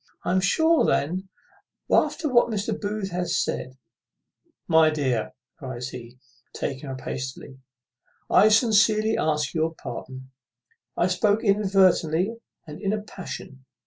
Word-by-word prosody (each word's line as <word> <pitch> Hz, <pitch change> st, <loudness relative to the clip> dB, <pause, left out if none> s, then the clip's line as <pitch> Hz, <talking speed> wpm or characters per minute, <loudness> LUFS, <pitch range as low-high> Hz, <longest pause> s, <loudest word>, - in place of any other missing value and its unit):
I -, -, 0 dB
am 185 Hz, +1 st, +2 dB
sure 320 Hz, -, +3 dB
then, 185 Hz, +6 st, 0 dB, 0.6 s
after 310 Hz, -, +2 dB
what 245 Hz, -4 st, +4 dB
Mr. 215 Hz, 0 st, -2 dB
Booth 205 Hz, -2 st, -3 dB
hath 180 Hz, 0 st, -2 dB
said 130 Hz, -5 st, -2 dB, 0.4 s
" -, -, -46 dB
"My 160 Hz, -1 st, +6 dB
dear," 130 Hz, -7 st, -1 dB, 0.3 s
cries 130 Hz, -3 st, -6 dB
he, 120 Hz, -1 st, -10 dB, 0.4 s
taking 135 Hz, +1 st, -4 dB
her 135 Hz, -, -4 dB
up 130 Hz, -, -8 dB
hastily, 130 Hz, +1 st, -6 dB, 0.7 s
"I 210 Hz, +3 st, +5 dB
sincerely 220 Hz, -1 st, +3 dB
ask 150 Hz, -2 st, 0 dB
your 165 Hz, 0 st, -1 dB
pardon; 130 Hz, 0 st, -8 dB, 0.7 s
I -, -, +3 dB
spoke 205 Hz, +4 st, +1 dB
inadvertently, 195 Hz, -1 st, +2 dB, 0.3 s
and 150 Hz, -2 st, -10 dB
in 200 Hz, 0 st, 0 dB
a 215 Hz, -1 st, -3 dB
passion. 135 Hz, -10 st, -9 dB
180 Hz, 135 wpm, -25 LUFS, 135-210 Hz, 0.7 s, My